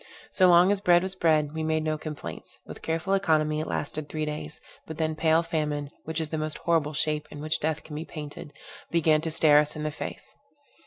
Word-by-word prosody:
So 185 Hz, -, +5 dB
long 175 Hz, +2 st, +6 dB
as 200 Hz, -1 st, 0 dB
bread 175 Hz, -2 st, +5 dB
was 190 Hz, 0 st, -2 dB
bread, 155 Hz, -5 st, +2 dB
we 160 Hz, -, -3 dB
made 155 Hz, 0 st, 0 dB
no 155 Hz, 0 st, 0 dB
complaints; 150 Hz, -1 st, -7 dB
with -, -, -10 dB
careful 165 Hz, +4 st, -1 dB
economy 155 Hz, -5 st, +2 dB
it 155 Hz, -, -3 dB
lasted 150 Hz, 0 st, -4 dB
three 155 Hz, -1 st, -2 dB
days, 150 Hz, 0 st, -6 dB, 0.3 s
but 160 Hz, -, -7 dB
then 160 Hz, -1 st, 0 dB
pale 160 Hz, +1 st, +3 dB
famine, 150 Hz, -3 st, -2 dB
which 160 Hz, +1 st, -3 dB
is 160 Hz, -2 st, -4 dB
the 160 Hz, -, -1 dB
most 155 Hz, 0 st, 0 dB
horrible 160 Hz, -3 st, +1 dB
shape 150 Hz, +1 st, -1 dB
in 145 Hz, -, -9 dB
which 155 Hz, +1 st, -1 dB
death 155 Hz, 0 st, -1 dB
can 150 Hz, -, -9 dB
be 155 Hz, -, -4 dB
painted, 150 Hz, -2 st, -8 dB, 0.4 s
began 160 Hz, -2 st, +3 dB
to 165 Hz, -, -2 dB
stare 155 Hz, -2 st, +6 dB
us 150 Hz, 0 st, 0 dB
in 155 Hz, -, -5 dB
the 155 Hz, -, -1 dB
face. -, -, -6 dB
155 Hz, 220 wpm, -27 LUFS, 150-165 Hz, 0.4 s, long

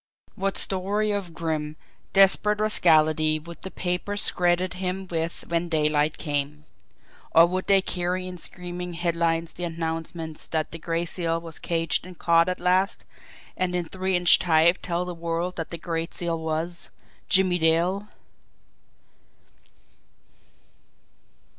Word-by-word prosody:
What 195 Hz, 0 st, -2 dB
story 200 Hz, +3 st, 0 dB
of 190 Hz, -5 st, -3 dB
grim, 155 Hz, -2 st, -3 dB, 0.4 s
desperate 195 Hz, +2 st, +4 dB
rascality 155 Hz, -6 st, +3 dB
would 170 Hz, +2 st, -11 dB
the 190 Hz, -, -6 dB
papers 185 Hz, +3 st, 0 dB
credit 180 Hz, +1 st, +1 dB
him 185 Hz, +1 st, -3 dB
with 165 Hz, 0 st, -3 dB
when 170 Hz, 0 st, -1 dB
daylight 150 Hz, -1 st, +1 dB
came? 150 Hz, 0 st, -3 dB, 0.7 s
Or 165 Hz, -, +9 dB
would 185 Hz, +2 st, -3 dB
they 195 Hz, -1 st, +4 dB
carry 180 Hz, 0 st, -2 dB
in 180 Hz, -1 st, -7 dB
screaming 180 Hz, 0 st, -4 dB
headlines 165 Hz, -1 st, 0 dB
the 175 Hz, -, -6 dB
announcement 165 Hz, -1 st, -4 dB
that 155 Hz, -1 st, -1 dB
the 165 Hz, -, -7 dB
Gray 165 Hz, +1 st, -2 dB
Seal 165 Hz, -1 st, 0 dB
was 165 Hz, -1 st, -8 dB
caged 165 Hz, +1 st, -1 dB
and 180 Hz, -2 st, -12 dB
caught 170 Hz, +1 st, +3 dB
at 180 Hz, -, -3 dB
last, 185 Hz, +3 st, +1 dB, 0.5 s
and 180 Hz, -1 st, -1 dB
in 175 Hz, -1 st, -1 dB
three 190 Hz, +2 st, -2 dB
inch 175 Hz, 0 st, +6 dB
type 170 Hz, 0 st, +4 dB
tell 175 Hz, 0 st, -2 dB
the 180 Hz, -, -5 dB
world 170 Hz, +1 st, -3 dB
that 165 Hz, -, -4 dB
the 170 Hz, -, -5 dB
Gray 165 Hz, 0 st, -3 dB
Seal 170 Hz, -2 st, -2 dB
was 160 Hz, +2 st, -3 dB, 0.4 s
Jimmie 185 Hz, -1 st, +3 dB
Dale! 170 Hz, +5 st, +2 dB
170 Hz, 135 wpm, -25 LUFS, 165-185 Hz, 0.7 s, Or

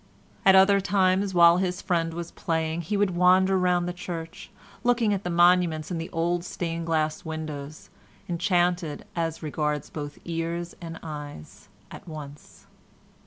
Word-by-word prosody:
At 190 Hz, -, +8 dB
other 195 Hz, +1 st, +6 dB
times, 190 Hz, 0 st, +1 dB
while 170 Hz, 0 st, +7 dB
his 180 Hz, 0 st, -1 dB
friend 165 Hz, -2 st, 0 dB
was 170 Hz, 0 st, -5 dB
playing, 160 Hz, 0 st, -2 dB
he 185 Hz, +5 st, -2 dB
would 200 Hz, -2 st, +2 dB
wander 185 Hz, +2 st, +4 dB
round 180 Hz, -1 st, +2 dB
the 180 Hz, -, -3 dB
church, 165 Hz, -2 st, -7 dB, 0.3 s
looking 240 Hz, -3 st, +2 dB
at 200 Hz, 0 st, -2 dB
the 180 Hz, -, -3 dB
monuments 175 Hz, -2 st, +3 dB
and 165 Hz, -2 st, -2 dB
the 165 Hz, -, -6 dB
old 170 Hz, +1 st, -1 dB
stained 170 Hz, -2 st, -4 dB
glass 155 Hz, -1 st, 0 dB
windows, 155 Hz, -2 st, -7 dB, 0.4 s
enchanted 175 Hz, -3 st, 0 dB
as 165 Hz, -1 st, -2 dB
regards 150 Hz, -1 st, -2 dB
both 145 Hz, -1 st, -6 dB
ears 170 Hz, +1 st, -3 dB
and 165 Hz, -1 st, -7 dB
eyes, 145 Hz, -, -9 dB, 0.2 s
at -, -, -11 dB
once. 150 Hz, -2 st, -10 dB
170 Hz, 150 wpm, -26 LUFS, 160-180 Hz, 0.4 s, At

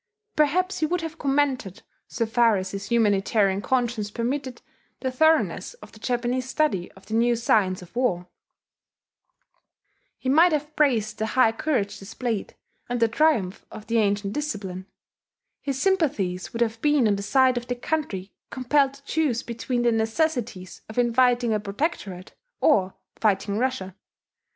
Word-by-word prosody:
Perhaps 365 Hz, +6 st, +2 dB
he 310 Hz, -, +1 dB
would 355 Hz, +2 st, -1 dB
have 325 Hz, 0 st, -6 dB
commended, 270 Hz, -, 0 dB, 0.2 s
so 230 Hz, -, -2 dB
far 230 Hz, -1 st, +3 dB
as 185 Hz, 0 st, -4 dB
his 200 Hz, 0 st, -5 dB
humanitarian 205 Hz, -3 st, +2 dB
conscience 240 Hz, -4 st, 0 dB
permitted, 250 Hz, +3 st, -3 dB, 0.4 s
the 260 Hz, -, -1 dB
thoroughness 315 Hz, -, +2 dB
of -, -, -14 dB
the 220 Hz, -, -16 dB
Japanese 245 Hz, +2 st, -1 dB
study 260 Hz, -, 0 dB
of 190 Hz, -, -18 dB
the 220 Hz, -, -7 dB
new 235 Hz, +1 st, +3 dB
science 200 Hz, -5 st, +1 dB
of 180 Hz, -, -17 dB
war: 200 Hz, -9 st, 0 dB, 1.9 s
he -, -, -7 dB
might 320 Hz, +6 st, +5 dB
have 300 Hz, 0 st, -2 dB
praised 225 Hz, -8 st, +1 dB
the 220 Hz, -, 0 dB
high 240 Hz, -1 st, +4 dB
courage 225 Hz, -4 st, -1 dB
displayed, 220 Hz, +2 st, -4 dB, 0.3 s
and 245 Hz, 0 st, -1 dB
the 230 Hz, -, +4 dB
triumph 225 Hz, -7 st, +1 dB
of 215 Hz, -, -10 dB
the 230 Hz, +1 st, +1 dB
ancient 200 Hz, -1 st, 0 dB
discipline; 200 Hz, -10 st, -4 dB, 0.7 s
his 275 Hz, -2 st, -3 dB
sympathies 260 Hz, -, 0 dB
would 235 Hz, 0 st, +1 dB
have 225 Hz, 0 st, -4 dB
been 295 Hz, -5 st, +3 dB
on 205 Hz, -, +2 dB
the 200 Hz, -, -4 dB
side 255 Hz, +5 st, +3 dB
of 245 Hz, 0 st, -4 dB
the 245 Hz, -, -2 dB
country 240 Hz, -8 st, -3 dB, 0.2 s
compelled 275 Hz, +1 st, +1 dB
to 275 Hz, -, -18 dB
choose 280 Hz, -5 st, 0 dB
between 240 Hz, +1 st, -2 dB
the 240 Hz, -, +3 dB
necessities 225 Hz, -, -1 dB
of 220 Hz, -, -10 dB
inviting 245 Hz, -1 st, +3 dB
a 215 Hz, -, +1 dB
protectorate 200 Hz, -, -4 dB, 0.3 s
or 190 Hz, -10 st, +3 dB, 0.2 s
fighting 200 Hz, 0 st, +1 dB
Russia. 240 Hz, -8 st, -2 dB
235 Hz, 155 wpm, -25 LUFS, 205-275 Hz, 1.9 s, might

